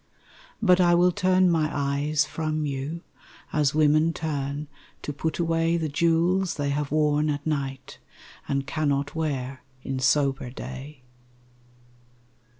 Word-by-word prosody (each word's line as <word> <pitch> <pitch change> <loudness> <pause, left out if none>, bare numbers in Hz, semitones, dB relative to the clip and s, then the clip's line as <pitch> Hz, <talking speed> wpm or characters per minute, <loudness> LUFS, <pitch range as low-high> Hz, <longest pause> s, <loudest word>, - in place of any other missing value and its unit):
But 180 -3 +5
I 175 -1 +5
will 180 +1 +4
turn 185 0 +3
my 155 -2 +1
eyes 145 +1 0
from 155 0 -2
you 140 +4 -4 0.5
As 150 -2 +2
women 155 +2 +4
turn 145 -2 -3 0.4
to 145 - -4
put 155 +2 -3
away 165 0 +1
The 160 -2 -2
jewels 170 +4 +2
they 145 -1 -1
have 145 0 -2
worn 150 0 +2
at 145 0 -3
night 140 -3 -3 0.5
And 140 0 -1
cannot 145 -1 -1
wear 135 -5 -3 0.2
in 135 -1 -3
sober 135 -1 +1
day. 130 +2 -9
150 Hz, 130 wpm, -25 LUFS, 140-165 Hz, 0.5 s, But